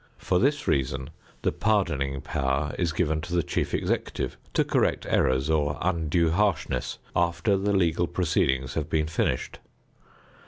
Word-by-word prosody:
For 90 - +1
this 145 +5 +1
reason, 65 +1 0 0.3
the - - +2
pardoning 70 -11 0
power 70 +2 -1
is 85 -3 +1
given 80 -2 0
to 85 +3 -4
the 85 - +2
chief - - -2
executive - - -2 0.2
to - - +4
correct - - +1
errors 65 +2 +2
or 75 -2 +1
undue 85 -2 +1
harshness 85 -9 0 0.2
after 85 +3 +2
the 100 +1 0
legal 85 -2 +2
proceedings 65 -7 0
have 75 -2 -3
been 75 -1 +1
finished. 75 -5 -1
80 Hz, 145 wpm, -26 LUFS, 70-90 Hz, 0.3 s, to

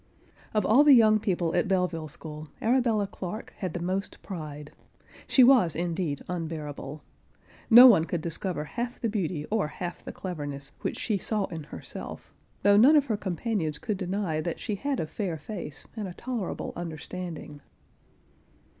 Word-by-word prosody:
Of 210 -3 +2
all 255 +7 +6
the 290 -2 +8
young 215 -2 +6
people 180 -6 0
at 175 - +2
Belleville 180 -4 0
school, 155 0 -9
Arabella 230 -3 +2
Clarke 195 +3 -7
had 185 -4 -3
the - - -2
most 185 +3 -3
pride. 150 -5 -7 0.6
She 260 - +6
was 240 - +5
indeed 170 -3 -2
unbearable. 155 -4 -5 0.7
No 240 +2 +11
one 200 -11 +7
could 170 -1 -2
discover 170 0 -3
half 240 +9 -4
the 230 - 0
beauty 180 -7 -2
or 215 -7 +1
half 175 +3 -6
the - - -6
cleverness 145 -6 -6
which - - -2
she 210 -4 -1
saw 210 +1 0
in 160 -3 -6
herself, - - -8 0.3
though 205 0 +6
none 255 +8 +8
of[Pg 290 -2 +5
47] - - -18
her 215 - +1
companions 185 -4 -2
could 210 +4 -3
deny 185 -4 -1
that 170 0 -3
she 215 - -3
had 275 +6 -2
a - - 0
fair 170 +1 -3
face 155 -4 -7
and 215 -3 -4
a 175 - -8
tolerable 235 -7 -4
understanding. 170 -2 -6
180 Hz, 165 wpm, -28 LUFS, 160-215 Hz, 0.7 s, No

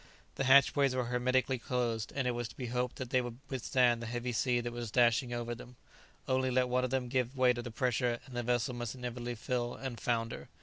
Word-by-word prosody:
The 135 - -2
hatchways 140 0 +5
were 125 -1 0
hermetically 125 +1 +1
closed, 115 -3 -1
and 135 -2 0
it - - +2
was 120 -1 -3
to - - -15
be 130 - -4
hoped 125 +1 -2
that 130 -1 -6
they 130 - +3
would 120 -1 -6
withstand 125 -2 +2
the 120 - -5
heavy 120 +1 -3
sea 120 +1 +1
that 120 0 -4
was 120 -1 -4
dashing 120 +1 +3
over 120 0 -3
them; 125 +1 -11 0.5
only 130 0 +2
let 125 0 +2
one 125 +1 +2
of 130 - 0
them 130 -1 -1
give 130 +1 -1
way 130 -1 +5
to 120 - -4
the 120 - -6
pressure, 120 +1 0
and 130 -2 -11
the 120 - 0
vessel 120 +1 0
must 120 0 -4
inevitably 120 -1 -4
fill 120 +1 -2
and 130 -4 -6
founder. 115 -1 -2
125 Hz, 230 wpm, -32 LUFS, 120-130 Hz, 0.5 s, hatchways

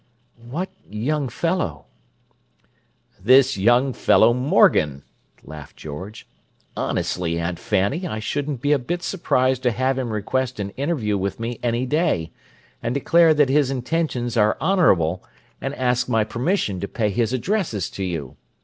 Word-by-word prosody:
"What 175 +9 -3 0.2
'young 135 +6 -2
fellow'?" 165 - -2 1.4
"This 130 +3 +5
young 120 +6 +3
fellow 115 0 +4
Morgan," 75 - +3 0.4
laughed 75 -2 -11
George; 85 +9 -8 0.5
"Honestly, 85 -2 -2
Aunt 85 +1 -3
Fanny, 105 - 0
I 110 - -4
shouldn't 140 +4 -3
be 145 - +1
a 145 - +4
bit 175 +8 -4
surprised 130 -8 0
to 125 - +2
have 130 +3 0
him 125 -2 -3
request 115 +4 -2
an 100 -1 -3
interview 125 -7 -1
with 100 +3 -3
me 115 +1 -4
any 120 +1 0
day, 130 - 0 0.5
and 120 +2 -2
declare 165 +3 +4
that 145 -3 +3
his 140 -1 +3
intentions 130 -2 -2
are 105 -2 +3
honourable, 95 - +2 0.4
and 135 +1 -3
ask 125 -1 0
my 115 -2 +2
permission 115 - -1
to 100 - -3
pay 110 -4 -1
his 115 +2 0
addresses 130 - -1
to 100 - -5
you. 80 -8 -4
125 Hz, 145 wpm, -22 LUFS, 100-140 Hz, 1.4 s, This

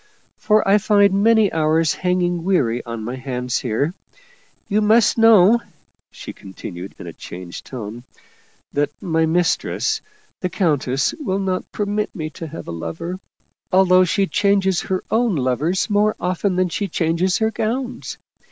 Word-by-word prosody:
For 215 -1 +2
I 200 +2 +5
find 200 -1 +3
many 220 -2 +4
hours 160 0 +2
hanging 175 -2 0
weary 125 -11 +1
on 115 -2 -5
my 120 +4 -5
hands 125 -1 -3
here. 130 +7 -1 0.7
You 210 0 +1
must 220 +1 +4
know/' 225 -1 +6 0.5
she - - -9
continued 95 -1 -9
in - - -9
a - - -8
changed 90 -1 -9
tone, 120 -1 -7 0.3
" - - -36
that 145 0 +1
my 160 -2 0
mistress, 170 +1 0 0.4
the 180 - -2
coun 165 -6 +1
tess, 130 +2 -1
will 195 -11 -1
not 190 -2 -2
permit 210 0 -2
me 155 -4 -4
to 165 - -7
have 160 +2 -9
a - - -5
lover, 165 - -5 0.5
although 185 -1 +5
she 195 +2 +1
changes 195 -2 +1
her 185 -1 -2
own 230 -3 +2
lovers 145 +7 0
more 210 0 +2
often 185 +1 -1
than 185 0 +1
she 200 +4 -2
changes 170 +2 0
her 220 0 +1
gowns. 245 +3 -3
180 Hz, 155 wpm, -20 LUFS, 145-205 Hz, 0.7 s, know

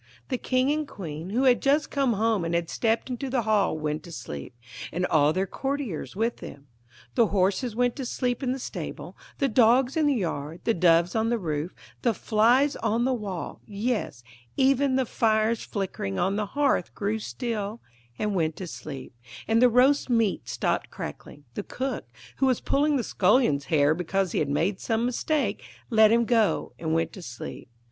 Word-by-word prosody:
The 255 -3 -1
King 255 +2 +1
and 305 0 -1
Queen, 165 - -7
who 240 +6 +1
had 250 -2 +4
just 290 +2 +2
come 275 -4 +2
home 220 -2 +1
and 165 0 -1
had 170 -1 -1
stepped 230 +2 0
into 255 +2 -3
the 250 -2 0
hall, 210 -6 +2
went 150 0 -2
to 175 - -12
sleep, 75 - -7 0.4
and 180 +2 -1
all 150 -3 +3
their 185 +4 0
courtiers 270 - -4
with 230 +3 0
them. 140 0 -10 0.5
The 235 -3 +4
horses 200 +5 0
went 245 0 +1
to 265 - -4
sleep 250 0 -1
in 255 -2 0
the 260 - -2
stable, 260 - -6 0.2
the 275 - +2
dogs 245 +2 +4
in 315 -2 +3
the 285 - +3
yard, 165 - -3
the 230 - +2
doves 170 0 +3
on 225 0 +1
the 240 - +1
roof, 160 -3 -3 0.3
the 235 -3 +1
flies 240 +8 +3
on 230 +2 0
the 260 - +2
wall; 200 -7 -5
yes, 205 - -2 0.3
even 270 0 +3
the 260 -1 +2
fire 220 -1 +2
flickering 190 - -4
on 195 +2 +1
the 210 0 -1
hearth 280 - 0
grew 210 +2 -1
still 220 -1 -4 0.4
and 210 -1 -1
went 160 -4 0
to 185 - -6
sleep, 140 -6 -8 0.3
and 225 +1 +3
the 250 - +7
roast 260 +4 +4
meat 230 -5 +1
stopped - - -1
crackling; 145 - -8
the - - -3
cook, 255 - -4 0.3
who 270 - +2
was 255 -3 +2
pulling 290 +1 +1
the 255 - 0
scullion's 195 - +2
hair 150 -2 +3
because 180 +2 -1
he - - 0
had 145 - 0
made 165 +7 0
some 225 0 0
mistake, 290 +5 0 0.3
let 220 -1 +6
him 235 +1 +4
go 225 -3 +1
and 160 -1 -1
went 165 - 0
to 190 - -9
sleep. 120 -5 -8
220 Hz, 190 wpm, -26 LUFS, 175-250 Hz, 0.5 s, the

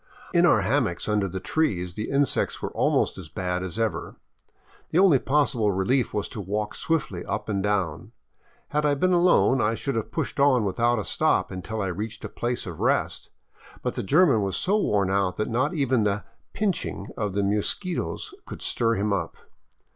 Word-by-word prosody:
In 175 0 +5
our 110 -10 +4
hammocks 110 -4 0
under 105 -2 +1
the 95 +1 -5
trees 90 - -1
the 105 +3 -4
insects 140 0 +1
were - - -4
almost - - +1
as - - -9
bad 90 -1 -2
as 90 0 -5
ever. 115 -2 -2 0.7
The - - 0
only 180 -8 +6
possible 130 -7 +2
relief 110 +7 +1
was 105 - -2
to 105 - -6
walk 105 +2 -2
swiftly 140 - -2
up - - -3
and 100 -2 -1
down. 95 -6 -1 0.6
Had 150 0 0
I 145 -1 +3
been 185 +6 +2
alone, 175 -7 +4
I 110 +2 +1
should 140 +4 -3
have 115 -2 -2
pushed 160 -3 -3
on 135 -5 +4
without 120 +5 +1
a 105 - -3
stop - - +1
until 100 +4 -4
I - - -1
reached 105 +5 -5
a - - -5
place 120 0 -3
of 85 -3 -7
rest, - - 0 0.5
but - - -1
the - - -3
German 140 - +4
was 100 -1 -1
so 195 +3 +1
worn 100 - +1
out 95 -2 +1
that 110 - -1
not 130 +9 0
even 130 -5 +2
the 105 0 0 0.2
" - - -44
pinching 185 - -2
" - - -16
of 105 -3 -3
the 100 - +1
mosquitos 105 - -2
could - - -8
stir 115 0 +1
him 100 0 0
up. 100 - -3
110 Hz, 195 wpm, -25 LUFS, 100-140 Hz, 0.7 s, only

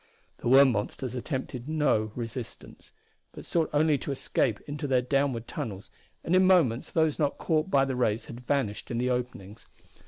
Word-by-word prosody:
The - - -4
worm 135 +1 +7
monsters 120 +3 -3
attempted 130 0 -4
no 145 -9 +1
resistance, 115 -1 -8 0.4
but - - -10
sought 165 -2 0
only 150 -1 +3
to - - -6
escape 120 -4 0
into 145 0 -5
their 130 -2 +2
downward 130 -3 0
tunnels, 110 -9 -6 0.3
and 175 - +1
in 185 0 +5
moments 150 -11 +3
those 160 -2 +1
not 145 -2 0
caught 160 +1 0
by 135 -5 +4
the 135 -1 -2
rays 115 -3 0
had 120 - -9
vanished 125 -5 -2
in 120 - -2
the 125 +1 0
openings. 115 -4 -5
130 Hz, 175 wpm, -28 LUFS, 120-150 Hz, 0.4 s, worm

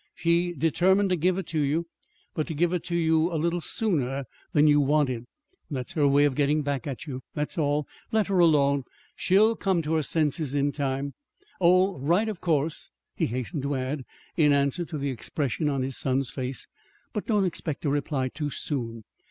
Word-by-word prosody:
She 175 0 +1
determined 185 +6 +2
to - - +4
give 180 +2 +1
it 195 - -3
to 160 - -1
you 150 +4 +1 0.5
but 155 - -2
to 160 - -4
give 175 +3 +1
it 180 - -1
to 175 -1 -2
you 160 0 +2
a 165 - -1
little 170 +2 0
sooner 140 - 0 0.3
than 150 0 +4
you 145 -1 +5
wanted. 135 -4 +1 0.4
That's 130 -5 -4
her 150 -3 +3
way 140 +1 +4
of 145 -2 +3
getting 145 +2 +1
back 140 0 -2
at 135 0 -5
you. 130 -4 -6
That's 150 +5 -2
all. 150 -3 0 0.2
Let 220 -2 +2
her 195 -2 +1
alone. 140 -5 +4 0.3
She'll 215 +5 +4
come 190 -6 0
to 155 +1 -1
her 160 - +2
senses 150 -2 0
in 145 0 +2
time. 140 -1 -2 0.5
Oh, 185 -1 +4
write, 175 +11 +2
of 210 - -6
course," 155 -2 0 0.3
he - - 0
hastened 130 +6 -3
to 140 +1 -1
add, 130 +2 -3 0.3
in 150 -5 +4
answer 140 +4 +1
to 160 -1 -5
the 140 -1 -2
expression 145 +3 -2
on 135 -2 -1
his 130 0 -2
son's 135 0 0
face. 130 -1 -5 0.5
"But 210 - -4
don't 210 -4 +2
expect 160 -4 -3
a - - +2
reply 140 -2 -1
too 145 +2 -4
soon. 115 -6 -4
150 Hz, 195 wpm, -26 LUFS, 140-170 Hz, 0.5 s, you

